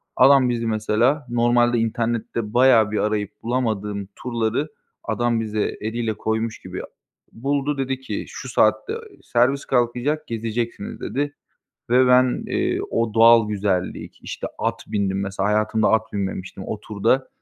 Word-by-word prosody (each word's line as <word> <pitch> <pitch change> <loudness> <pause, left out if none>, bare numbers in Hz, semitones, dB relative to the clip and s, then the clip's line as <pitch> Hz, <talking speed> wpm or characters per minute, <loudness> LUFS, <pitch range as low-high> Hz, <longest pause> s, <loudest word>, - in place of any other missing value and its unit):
Adam 135 -1 +6
bizi, 115 -1 -1
mesela 115 +6 +1
normalde 120 0 +3
internette 115 -1 -2
bayağı 120 -4 +5
bir 110 - -1
arayıp 105 -1 -1
bulamadığım 105 -5 -2
turları 120 +3 -1 0.4
adam 120 +1 0
bize 110 -1 -2 0.2
eliyle 110 +1 -2
koymuş 110 +1 -2
gibi - - -7 0.5
buldu 140 +3 -1
dedi 135 -1 -2
ki, 130 - -4
şu - - -8
saatte 430 - +2 0.3
servis 130 +4 +1
kalkacak, 125 +4 0
gezeceksiniz 115 -1 -4
dedi 145 +2 -2 0.6
ve 125 +1 +5
ben, 125 0 +4
eee, - - 0
o 115 -1 0
doğal 115 -1 +6
güzellik, 100 -3 -2
işte, - - -5
at - - -2
bindim 100 -1 -1
mesela, 100 +1 -1
hayatımda 110 +1 +2
at 110 0 +1
binmemiştim. 95 -1 -4
O 105 - -4
turda, 115 +6 0
115 Hz, 135 wpm, -22 LUFS, 105-125 Hz, 0.6 s, Adam